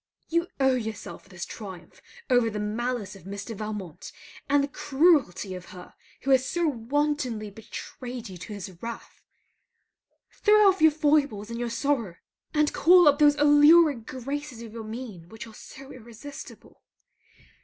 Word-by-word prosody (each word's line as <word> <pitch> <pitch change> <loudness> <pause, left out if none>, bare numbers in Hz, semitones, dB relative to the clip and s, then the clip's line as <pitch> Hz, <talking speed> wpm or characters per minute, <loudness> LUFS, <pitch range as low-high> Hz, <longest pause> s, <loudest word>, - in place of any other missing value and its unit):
You 335 +1 +1
owe 265 -2 +3
to - - -3
yourself 220 -2 -8
this 185 -2 -6
triumph 190 -5 -10 0.3
over 245 -3 +3
the 210 - -5
malice 215 0 -3
of 190 -3 -15
Mr. 200 +3 -6
Valmont 200 -5 -6 0.4
and 285 0 +4
the - - -1
cruelty 280 - +2
of 180 -1 -8
her 180 -1 -12 0.3
who 275 - -1
has 260 -1 +5
so 340 +6 -1
wantonly 255 -4 -1
betrayed 240 +3 -8
you 185 -2 -10
to 210 - -8
his 190 -3 -9
wrath. 235 0 -8 1.1
Throw 420 -1 +4
off 385 -3 +3
your 315 - +8
foibles 290 -8 +1
and 230 - -5
your 240 -1 -2
sorrow; 230 -6 -1 0.4
and 300 -1 +1
call 355 -1 +6
up 290 0 +5
those 295 -1 +6
alluring 295 -1 +6
graces 260 -1 -6
of 225 -2 -10
your 230 -1 -7
mien 215 -7 -8
which 225 +2 -9
are 225 - -13
so 270 +5 -12
irresistible. 240 +4 -12
245 Hz, 155 wpm, -26 LUFS, 210-290 Hz, 1.1 s, your